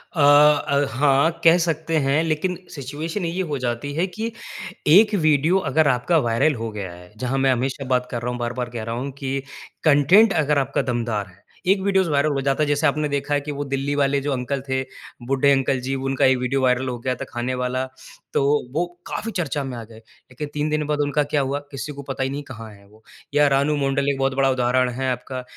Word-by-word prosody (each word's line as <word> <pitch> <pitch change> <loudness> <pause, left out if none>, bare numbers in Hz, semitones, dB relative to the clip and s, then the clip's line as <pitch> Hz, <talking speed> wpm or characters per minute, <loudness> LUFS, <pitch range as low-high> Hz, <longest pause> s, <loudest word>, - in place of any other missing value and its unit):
अ - - -3
अ, 145 0 +5
हाँ, 140 +5 +3
कह 165 +1 +7
सकते 160 0 -1
हैं। 145 +4 +2
लेकिन 165 +3 -1 0.2
सिचुएशन 155 +7 -4
ये 170 +3 -2
हो 145 - 0
जाती 125 +3 -3
है 170 +5 0
कि 220 +4 -4 0.6
एक 210 +7 +6
वीडियो 155 +4 +3
अगर 155 -1 +3
आपका 135 +6 +2
वायरल 135 +6 +2
हो 115 0 -4
गया 100 -4 -6
है। 90 +1 -14
जहाँ 130 +3 -2
मैं 135 0 +3
हमेशा 130 +2 -2
बात 125 0 -1
कर 120 - -3
रहा 125 - -2
हूँ, 125 - -5
बार-बार 120 +1 -3
कह 115 -2 -6
रहा 115 +1 -4
हूँ 135 +3 -4
कि 135 0 -1 0.4
कंटेन्ट 165 +9 +5
अगर 150 0 +1
आपका 135 0 0
दमदार 115 -4 -2
है 95 +1 -21 0.3
एक 195 -1 +2
वीडियोज़ 190 -2 +2
वायरल 145 +1 +2
हो 135 - -1
जाता 135 +2 +1
है 150 - 0
जैसे 145 +1 +2
आपने 150 +1 0
देखा 145 +1 -2
है 145 - +2
कि 150 +1 -5
वो 145 0 -3
दिल्ली 140 +1 -2
वाले 140 0 +2
जो 145 +1 -2
अंकल 130 +1 -2
थे, 130 0 0 0.5
बूढ़े 135 +1 +3
अंकल 135 -1 +2
जी 135 +2 -3
उनका 135 0 0
ये 130 - +5
वीडियो 125 +2 -1
वायरल 130 0 +2
हो 125 - -4
गया 130 +1 -1
था - - -6
खाने 120 +2 -3
वाला। 125 +1 -1 0.5
तो - - +2 0.3
वो 170 +3 +1 0.2
काफ़ी 225 +1 -4
चर्चा 155 -6 -2
में 130 -2 -5
आ 115 - -6
गए। 110 0 -14
लेकिन 125 +5 -10
3 150 +1 -1
दिन 155 0 0
बाद 150 -1 -1
उनका 145 +1 +1
क्या 145 0 0
हुआ 140 +1 -1
किसी 135 +1 -5
को 140 - -8
पता 135 -1 -3
ही 130 - -1
नहीं 145 +1 -4
कहाँ 115 -5 -9
हैं 100 0 -18
वो। 110 +2 -22 0.3
या 145 0 +5
रानू 140 +2 +2
मंडल 140 +1 +1
एक 140 - 0
बहुत 135 0 +1
बड़ा 135 0 +3
उदाहरण 125 0 +2
है 130 +2 -2
आपका, 125 +1 -5
135 Hz, 230 wpm, -22 LUFS, 125-150 Hz, 0.6 s, कह